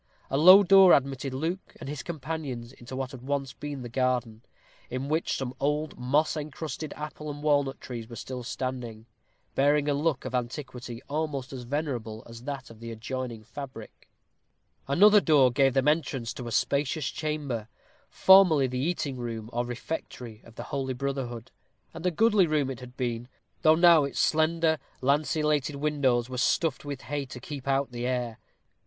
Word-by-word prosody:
A 135 - +1
low 185 +6 +9
door 195 -1 +8
admitted 135 0 +1
Luke 165 +8 -4
and - - -8
his 145 -2 -4
companions 140 -6 -5
into 125 0 -10
what 130 -1 -3
had 130 - -10
once 135 -1 -2
been 145 -2 -6
the - - -5
garden, 125 -3 -1 0.5
in 130 +3 -4
which 160 +2 0
some 130 -2 -4
old 150 +2 -1
moss 140 +7 +1
encrusted 155 0 -5
apple 150 0 -6
and 145 0 -7
walnut 145 -3 +2
trees 115 -3 -7
were 115 - -8
still 125 +1 -6
standing, 120 -3 -5 0.5
bearing 145 +1 +3
a 145 - +2
look 145 -1 0
of 130 - -5
antiquity 125 -1 -4
almost 145 -2 -3
as 125 -2 -7
venerable 120 -6 -3
as 115 +1 -11
that 140 -4 -5
of 110 - -14
the 115 0 -7
adjoining 115 0 -5
fabric. 130 -1 -10 0.8
Another 205 +10 +6
open 205 - +3
door 140 -5 +5
gave 135 +1 +3
them 135 +1 +2
entrance 135 -6 0
to 125 - -7
a - - -5
spacious 140 +4 0
chamber, 145 -8 -3 0.4
formerly 185 -7 +6
the 125 0 -3
eating 145 -3 -1
room 115 -2 -5
or 120 +1 -1
refectory 120 -3 -6
of 115 - -16
the 120 - -6
holy 135 -2 -1
brotherhood, 125 -3 -4 0.4
and 180 - -3
a - - +5
goodly 205 +1 +4
room 150 -4 +1
it 125 - -7
had 125 0 -12
been, 120 -2 -2 0.3
though 155 0 +6
now 170 -2 +6
its 140 - -4
slender 160 0 +2 0.2
lanceolated 150 +1 +1
windows 140 -5 +1
were 125 -1 -4
stuffed 150 +2 +1
with 140 -2 -6
hay 145 +1 -3
to 130 -2 -9
keep 140 +1 -8
out 135 -1 +1
the 120 0 -3
air. 125 -3 -2
135 Hz, 175 wpm, -28 LUFS, 125-150 Hz, 0.8 s, low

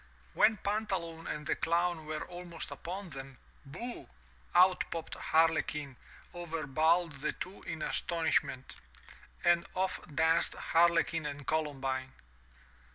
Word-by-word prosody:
When 215 0 +5
Pantaloon 190 -6 -2
and 150 0 -4
the - - +1
Clown 170 -1 0
were 155 0 -3
almost 175 -2 -7
upon 185 +2 -6
them, 135 -1 -8 0.3
booh! 235 - -7 0.5
out 180 +1 +6
popped 165 -1 -5
Harlequin, 150 -3 +1 0.4
over 165 -2 -4
bowled 160 +4 +3
the 140 -1 -3
two 185 - -7
in 160 -2 -3
astonish 165 -2 +2
ment, 135 -2 -8 0.7
and 175 0 +4
off 185 0 0 0.2
danced 160 +2 +3
Harlequin 165 -2 +3
and 145 -1 -6
Columbine. 135 -4 -1
165 Hz, 120 wpm, -32 LUFS, 150-175 Hz, 0.7 s, out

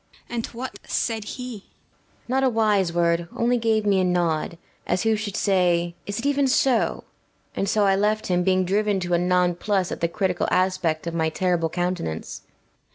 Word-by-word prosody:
BELLAMIRA. - - -5
And 230 - -1
what 250 +2 -7
said 225 -2 -1
he? 250 -1 -6
PILIA - - -23
BORZA. - - -36
Not 265 +1 +1
a 265 - +4
wise 210 -6 +2
word; 170 0 +1
only 240 +1 +2
gave 220 -2 +1
me 200 -2 +3
a - - +2
nod, 170 -2 0 0.3
as 180 +3 0
who 225 -1 +3
should 210 -1 -4
say, 175 -3 +2
"Is 205 0 -3
it 230 - -4
even 285 -1 +2
so?" 255 -2 +2 0.5
and 195 - -1
so 210 0 +2
I 195 -1 +4
left 210 +2 +1
him, 180 -1 +1
being 185 0 +2
driven 205 +1 +1
to 175 0 -2
a 170 - +3
non 180 0 +2
plus 190 +1 -1
at - - -5
the 170 - +2
critical 185 +1 -1
aspect 185 -4 0
of 170 - -3
my 160 -1 +1
terrible 170 -1 0
countenance. 175 - -3
BELLAMIRA. - - -37
190 Hz, 205 wpm, -24 LUFS, 175-220 Hz, 0.5 s, a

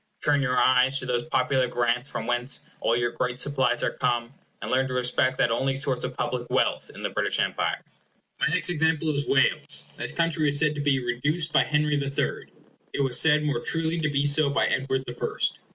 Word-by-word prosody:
Turn 145 -1 +3
your 125 -2 0
eyes 130 +1 +4
to 130 - -5
those 125 -1 0
popular 130 -2 +1
grants 120 +2 -1
from - - -5
whence 120 +2 -1 0.2
all 115 - +1
your 120 0 0
great 125 +1 -3
supplies 130 -3 0
are - - +1
come, 120 -1 -1 0.3
and - - -6
learn 130 +1 +2
to 130 - -4
respect 125 +1 +1
that 115 - +2
only 135 +3 0
source 135 -2 -2
of - - -5
public - - -3
wealth - - 0
in - - -9
the - - -2
British - - +1
Empire. - - -1 0.6
My - - +2
next 180 +2 +2
example 160 -1 +1
is 140 0 -1
Wales. 135 -1 +2
This - - -3
country 165 -2 0
was 145 -1 +1
said 150 0 +2
to 145 - -4
be 135 -3 +1
reduced 150 +7 -1
by - - +5
Henry 150 -1 +1
the 140 -1 -2
Third. 140 - -3 0.4
It - - -1
was 130 -2 +1
said 150 -1 +4
more 150 +1 0
truly 165 +1 -1
to 155 -1 0
be 140 0 0
so 145 0 +3
by 140 - +1
Edward 130 0 -1
the 120 - -6
First. 120 - -2
135 Hz, 215 wpm, -25 LUFS, 125-150 Hz, 0.6 s, by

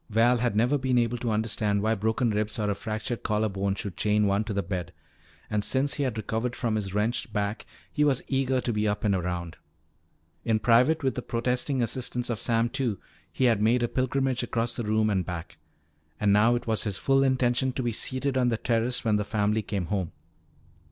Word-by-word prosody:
Val 115 +3 +4
had 120 -3 0
never 125 +7 +2
been 130 -1 +1
able 120 0 +1
to 120 - -2
understand 105 -2 0
why 110 +1 +2
broken 110 +3 0
ribs 105 +1 -2
or 105 -2 0
a - - +1
fractured 110 +3 -4
collar 110 0 0
bone 95 0 -1
should 100 -3 -5
chain 105 +1 +2
one 100 +1 +2
to 110 - -5
the 100 -1 -1
bed. 90 -3 -4 0.6
And 105 -1 -1
since 135 +4 +1
he - - -3
had 130 -5 -1
recovered 115 +3 -2
from 120 -3 -1
his 100 -3 -2
wrenched 110 +2 -1
back 105 0 -2 0.3
he 150 - +2
was 140 -3 +2
eager 130 -1 +1
to 120 - -1
be 105 0 0
up 105 0 -1
and 105 -2 +2
around. 90 -2 -3 0.9
In 110 -1 +2
private, 125 +8 +3
with 130 - +1
the 125 - -4
protesting 125 +3 -1
assistance 125 +1 -2
of 110 - -3
Sam 115 0 +2
Two, 120 -6 -2 0.3
he - - -2
had 115 -5 +3
made 120 +3 +3
a - - +2
pilgrimage 130 +1 0
across 115 -1 -1
the 120 - -2
room 110 +1 +2
and 95 -2 +1
back. 90 -1 -7 0.6
And 100 -1 +3
now 110 +4 +5
it 120 - -3
was 110 -1 +1
his 100 -4 -2
full 135 0 +2
intention 130 -1 +2
to 130 - -3
be 120 - 0
seated 130 +4 -2
on 125 -1 +3
the 115 - 0
terrace 120 +2 0
when 110 -2 +3
the 105 - 0
family 105 +1 0
came 100 -3 -3
home. 95 -2 -2
115 Hz, 215 wpm, -27 LUFS, 105-125 Hz, 0.9 s, now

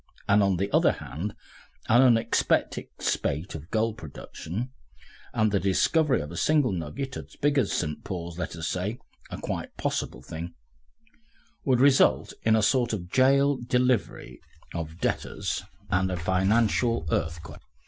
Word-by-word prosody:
And 100 +1 +5
on 100 -2 +2
the 100 +2 -1
other - - +4
hand 85 +11 -6 0.5
an 120 +3 +6
unexpected 120 -4 +2
spate 75 +7 -1
of 80 +2 -8
gold 110 0 0
production, 85 - -6 0.6
the 105 -2 +2
discovery 130 - +2
of 75 +2 -7
a 85 - -7
single 150 - +3
nugget 95 - -4
as - - -10
big 145 -1 +2
as - - +1
St. 75 -3 -2
Paul's, 85 -2 -5
let 85 - -4
us 80 -1 -4
say 95 +7 -2 0.3
a - - -6
quite - - -5
possible - - -2
thing 85 +2 -7 1.1
would 130 -3 +3
result 135 0 +4
in 110 0 +3
a 110 - +2
sort 120 +1 +2
of 90 -4 -5
jail 140 +2 +4
delivery 125 -1 0 0.3
of 80 -1 -5
debtors - - -2 0.3
and 95 +1 +2
a 90 - -2
financial 100 +5 +2
earthquake. 80 0 -3
100 Hz, 145 wpm, -27 LUFS, 85-125 Hz, 1.1 s, an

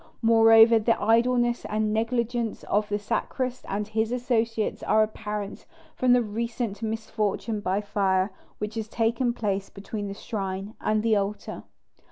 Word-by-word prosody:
Moreover, 225 0 +7
the 225 +2 +1
idleness 240 +2 +2
and 215 0 -1
negligence 235 0 -1
of 210 +1 0
the 205 - 0
sacrist 255 +4 -3
and 205 +1 -2
his 220 +1 -1
associates, 230 -3 -1
are 215 0 +3
apparent 210 -1 -5 0.3
from 250 -1 +3
the 245 -1 +4
recent 225 -1 -3
misfortune 220 -1 -2
by 195 0 -1
fire 195 -1 +1 0.3
which 210 +1 -4
has 220 -1 -4
taken 230 +2 0
place 200 -4 -2
between 205 +1 -6
the 200 - -6
shrine 195 -1 -4
and 215 0 +1
the 225 -1 +3
altar." 200 +1 -3
220 Hz, 145 wpm, -26 LUFS, 205-230 Hz, 0.3 s, Moreover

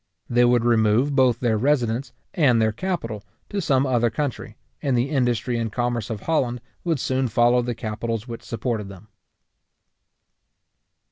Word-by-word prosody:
They 120 0 +3
would 120 -1 +3
remove 115 +4 +3
both 125 -3 +3
their 115 -4 +1
residence 125 -1 0 0.2
and 130 -8 +3
their 110 0 +3
capital 115 - -3 0.3
to 200 - -2
some 135 -5 +2
other 120 -3 +2
country, 135 +2 -4 0.2
and 135 -3 +1
the 125 +4 0
industry 125 -3 0
and 115 -2 -2
commerce 120 -2 -2
of 110 -3 -4
Holland 125 -7 0 0.2
would 165 -5 0
soon 130 +1 0
follow 120 +2 +3
the 120 -1 -3
capitals 115 +1 -4
which 115 -1 -7
supported 110 -3 -3
them. 100 +2 -13
120 Hz, 150 wpm, -23 LUFS, 115-130 Hz, 0.3 s, They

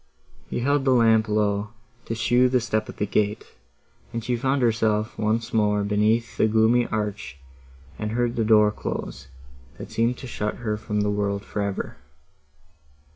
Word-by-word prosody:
He - - -2
held 140 +2 +2
the 130 -1 +3
lamp 110 -2 +4
low, 105 0 0 0.3
to 115 - -3
show 120 +3 +3
the 125 0 +2
step 110 -2 -2
of - - -8
the 105 - 0
gate, 105 0 0 0.7
and 115 -1 -4
she 125 +1 0
found 130 +2 0
herself 110 -1 +1
once 110 +1 -1
more 105 -2 +2
beneath 105 +3 +1
the - - +3
gloomy 110 +2 +3
arch, 105 -9 -4 0.6
and 110 0 -3
heard 120 0 0
the 115 - +1
door 105 -1 +5
close, 65 -9 -6 0.5
that - - -9
seemed 115 +2 +1
to - - -9
shut 105 -4 -3
her 110 -3 -2
from 105 -1 -2
the 105 0 +1
world 100 0 -2
for 105 - -4
ever. 100 -1 -3
110 Hz, 170 wpm, -24 LUFS, 105-115 Hz, 0.7 s, door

